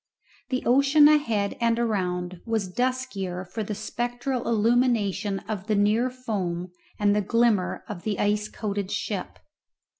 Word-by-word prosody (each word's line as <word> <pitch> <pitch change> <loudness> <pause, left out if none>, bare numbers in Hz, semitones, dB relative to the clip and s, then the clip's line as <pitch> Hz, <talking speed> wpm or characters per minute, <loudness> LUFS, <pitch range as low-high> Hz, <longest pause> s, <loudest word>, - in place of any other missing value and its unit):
The 255 -1 -1
ocean 280 +4 +6
ahead 230 -10 +2
and 230 0 +2
around 180 -6 -1
was 220 -5 -1
the - - -24
duskier 205 -8 -2
for 205 +5 -5
the 210 0 -4
spectral 245 +4 -3
illumination 225 -3 +2
of 210 -2 -4
the 215 - +2
near 210 +5 +3
foam 190 -9 -3 0.3
and 205 -1 +3
the 210 - +2
glimmer 225 -2 +1
of 205 -5 -6
the 210 0 -2
ice 210 +1 +1
coated 200 -3 -4
ship. - - -3
215 Hz, 145 wpm, -26 LUFS, 200-240 Hz, 0.3 s, ocean